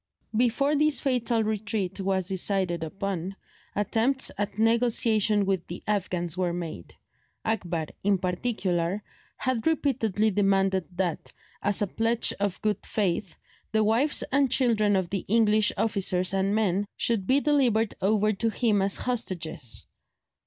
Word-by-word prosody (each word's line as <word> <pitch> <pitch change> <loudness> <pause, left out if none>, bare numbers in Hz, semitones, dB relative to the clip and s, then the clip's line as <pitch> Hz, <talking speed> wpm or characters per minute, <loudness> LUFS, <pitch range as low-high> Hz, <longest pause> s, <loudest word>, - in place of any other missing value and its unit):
Before 250 +5 +2
this 305 0 +3
fatal 245 -4 0
retreat 210 -3 -2
was 190 -2 -1
decided 185 -3 0
upon, 190 +2 -4 0.4
attempts 230 +6 +1
at 205 0 -3
negotiation 225 -2 +2
with 190 -3 -1
the 175 - -7
Afghans 180 -5 -1
were 180 -2 -1
made; 165 - -6 0.5
Akbar, 175 -7 -1 0.2
in 200 0 +3
particular, 180 -1 -1 0.3
had 255 -2 -1
repeatedly 225 - +1
demanded 195 -2 +2
that, 175 -4 -2 0.3
as 205 +1 +2
a - - +2
pledge 225 +4 +1
of 200 -2 -1
good 210 -2 0
faith, 195 -3 -2 0.4
the 220 0 +3
wives 235 +8 +2
and 275 0 +3
children 225 -5 +2
of 185 -3 -1
the 195 -2 -2
English 215 -1 +3
officers 190 -4 +1
and 195 +1 +1
men 205 -2 +1
should 215 -5 0
be 270 +2 +4
delivered 250 -8 +2
over 215 +2 +2
to 225 +3 0
him 215 -2 +1
as 195 0 +1
hostages. 180 - -2
205 Hz, 135 wpm, -26 LUFS, 190-225 Hz, 0.5 s, be